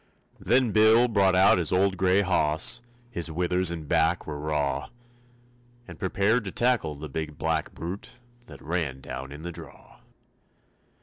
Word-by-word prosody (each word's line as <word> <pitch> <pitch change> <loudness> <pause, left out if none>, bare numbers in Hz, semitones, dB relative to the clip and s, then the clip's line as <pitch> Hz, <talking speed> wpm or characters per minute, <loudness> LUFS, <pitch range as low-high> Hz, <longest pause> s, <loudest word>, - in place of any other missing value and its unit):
Then 125 -1 +2
Bill 110 +3 +5
brought 100 -5 +3
out 95 0 +5
his 85 - 0
old 95 +1 +2
gray 95 +1 +3
hoss, 80 0 +1 0.3
His 85 -6 -1
withers 90 +2 +1
and 80 -3 -5
back 80 +3 +1
were 75 -1 -6
raw, 75 -2 -2 1.0
And - - -11
prepared 100 +5 +1
to 95 - -4
tackle 120 -11 0
the 75 +2 -7
big 75 +1 -5
black 80 -1 -2
brute 85 +5 -7 0.3
That - - -13
ran 80 -5 -2
down 65 +1 -7
in 75 +2 -9
the 85 - -5
draw. - - -13
85 Hz, 150 wpm, -26 LUFS, 75-100 Hz, 1.0 s, Bill